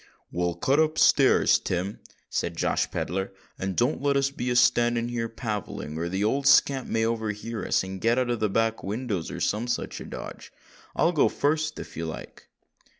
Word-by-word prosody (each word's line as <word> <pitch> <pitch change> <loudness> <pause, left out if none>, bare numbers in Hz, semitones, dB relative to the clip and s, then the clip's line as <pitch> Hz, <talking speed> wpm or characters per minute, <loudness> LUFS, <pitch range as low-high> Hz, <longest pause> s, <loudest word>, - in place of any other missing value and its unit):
"Well, 85 -1 -1
cut 140 +3 +2
up 155 0 +2
stairs, - - +5
Tim," 90 +3 -3 0.3
said - - -3
Josh - - 0
Pedler, 95 +3 -3 0.3
"and 95 -1 -2
don't 125 +5 +1
let 140 0 +2
us 140 0 +1
be 125 -2 -3
a 125 - 0
standing 120 -1 +3
here 115 -1 -2
palavering—or 100 -8 -4
the 95 +3 -1
old 135 +6 +1
scamp 135 -1 +4
may 110 0 +1
overhear 110 0 -3
us - - +1
and 95 0 -7
get 115 +2 +2
out 130 -1 +1
by - - +2
the 110 -3 0
back 115 +2 0
windows, 105 -4 -3
or - - -6
some 110 +4 0
such 120 - -3
a - - -7
dodge. - - -8 0.4
I'll 170 - +3
go 160 - +3
fust, 155 +1 0
if - - -9
you 80 0 -3
like." 80 - -9
115 Hz, 190 wpm, -26 LUFS, 95-130 Hz, 0.4 s, stairs